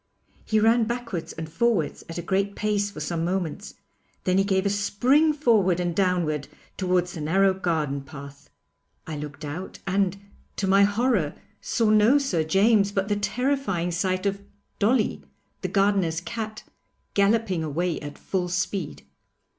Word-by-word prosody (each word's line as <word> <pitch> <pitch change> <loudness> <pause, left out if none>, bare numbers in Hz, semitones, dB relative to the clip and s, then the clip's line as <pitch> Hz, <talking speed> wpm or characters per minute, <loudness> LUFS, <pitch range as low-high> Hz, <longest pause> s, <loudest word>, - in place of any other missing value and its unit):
He 215 - +2
ran 225 +1 +4
backwards 235 -7 -4
and 160 -1 -6
forwards 180 0 0
at 165 - -6
a 170 - -4
great 195 +2 0
pace 205 -1 0
for 200 - -9
some 165 +2 -2
moments, 175 -2 -3 0.5
then 185 +1 +2
he - - +4
gave 190 -1 +1
a - - +3
spring 250 +10 +3
forward 220 - +2
and 175 -2 -1
downward 175 -6 0 0.3
towards 180 -2 0
the 160 - -6
narrow 190 +5 +3
garden 160 -7 -1
path. 140 +1 -11 0.6
I 160 - -5
looked 150 +1 -7
out 165 +6 -6
and, 195 0 +1 0.4
to 200 - -1
my 195 +1 +5
horror, 205 - +1 0.3
saw 225 -2 +1
no 215 +6 +5
Sir 230 - 0
James, 200 +4 +3
but 195 0 -1
the 205 - +2
terrifying 210 -4 -1
sight 185 +2 -1
of 200 0 -1 0.4
'Dolly,' 215 +2 +2 0.4
the - - -1
gardener's 195 -5 +2
cat, 220 +3 -6 0.5
galloping 200 -4 +2
away 165 +3 -1
at 145 -1 -8
full 180 -2 -2
speed. 180 -2 -3
195 Hz, 155 wpm, -25 LUFS, 170-210 Hz, 0.6 s, my